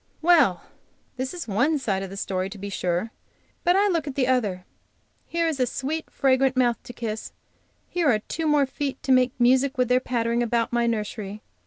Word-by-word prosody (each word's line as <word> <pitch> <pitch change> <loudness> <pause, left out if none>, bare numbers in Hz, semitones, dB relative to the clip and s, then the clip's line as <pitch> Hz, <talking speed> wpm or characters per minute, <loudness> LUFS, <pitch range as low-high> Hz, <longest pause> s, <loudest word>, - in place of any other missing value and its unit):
Well! 310 - +4 0.5
this 260 +1 -2
is 350 -6 -6
one 250 +10 +2
side 205 -8 -1
of 195 - -5
the 195 - -8
story, 190 -1 -2
to 205 - -9
be 200 +1 -6
sure, 180 +4 -1 0.5
but 355 0 +4
I 405 +1 +4
look 335 -5 0
at 275 - -5
the 265 - +2
other. 210 -8 0 0.6
Here 335 0 0
is 310 -4 -2
a 250 - +2
sweet, 300 +7 -3
fragrant 265 -1 +2
mouth 240 -2 +2
to - - -8
kiss; 220 -2 -5 0.5
here 345 -4 +1
are 225 - +4
two 315 +9 -4
more 295 -2 +4
feet 275 0 -4
to 270 - 0
make 255 -1 +3
music 260 +3 +3
with 250 -1 +1
their 250 0 +4
pattering 235 -2 -1
about 235 0 0
my 235 0 +2
nursery. 210 -2 -3
250 Hz, 200 wpm, -25 LUFS, 220-280 Hz, 0.6 s, Well